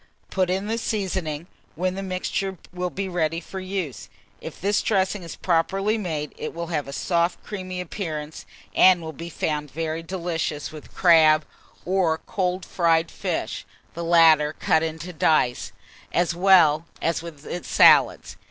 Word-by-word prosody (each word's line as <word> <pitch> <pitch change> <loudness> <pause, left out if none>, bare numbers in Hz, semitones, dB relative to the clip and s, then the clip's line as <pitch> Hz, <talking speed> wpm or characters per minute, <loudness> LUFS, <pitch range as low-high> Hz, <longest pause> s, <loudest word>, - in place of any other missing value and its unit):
Put 185 -2 +1
in 190 +2 -1
the 225 +2 -2
seasoning, 185 -8 -2 0.3
when 180 +2 -1
the 195 - -5
mixture 190 0 -3 0.2
will 180 0 -2
be 195 +2 -4
ready 165 -3 -1
for 190 +3 -8
use. 185 -7 -5 0.3
If - - -8
this 200 +2 +1
dressing 195 -1 0
is 170 -2 -8
properly 195 +5 +1
made, 160 -8 -3
it 155 - -5
will 170 0 -3
have 150 -3 -1
a - - -6
soft 170 +4 0
creamy 185 -3 -6
appearance, 160 -4 -5 0.3
and 185 -2 +5
will 160 0 -6
be 165 +3 -8
found 150 -2 -2
very 160 +2 -3
delicious 165 -4 -3
with 155 -1 -12
crab, 160 -3 +5 0.4
or 180 -3 +1
cold 180 0 -2
fried 165 -2 +1
fish - - -3 0.3
(the 170 - -5
latter 160 -3 +5
cut 160 0 +2
into 165 +2 -4
dice), 155 -6 +1 0.4
as 175 0 +1
well 170 -4 +5
as 165 0 0
with 160 -3 -10 0.2
salads. - - +4
170 Hz, 150 wpm, -24 LUFS, 160-185 Hz, 0.4 s, and